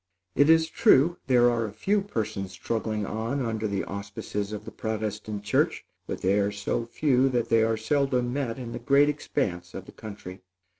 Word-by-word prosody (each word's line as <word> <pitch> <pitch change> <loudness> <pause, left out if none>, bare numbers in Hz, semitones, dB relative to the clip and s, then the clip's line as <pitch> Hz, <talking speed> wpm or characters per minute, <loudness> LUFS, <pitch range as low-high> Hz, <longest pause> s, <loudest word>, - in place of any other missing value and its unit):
It 145 +8 +4
is 160 0 +5
true, 170 - +4
there 120 -2 +5
are 115 -2 0
a - - -7
few 195 - +1
persons 105 - -4
struggling 110 +2 -2
on 115 +7 -2
under 110 -1 -2
the 100 -1 -2
auspices 100 +1 -5
of 105 - -6
the - - -7
Protestant 105 -1 -4
church; 105 - +1 0.2
but - - -4
they 95 +2 +2
are 100 0 +1
so 100 +3 -2
few 135 0 +2
that 120 -2 -1
they 115 -1 +4
are 110 0 +2
seldom 125 0 0
met 135 -4 -2
in 120 -3 -6
the - - -5
great 140 +1 +4
expanse 95 - -3
of - - -6
the - - -12
country. 100 -3 -9
115 Hz, 190 wpm, -27 LUFS, 105-135 Hz, 0.2 s, is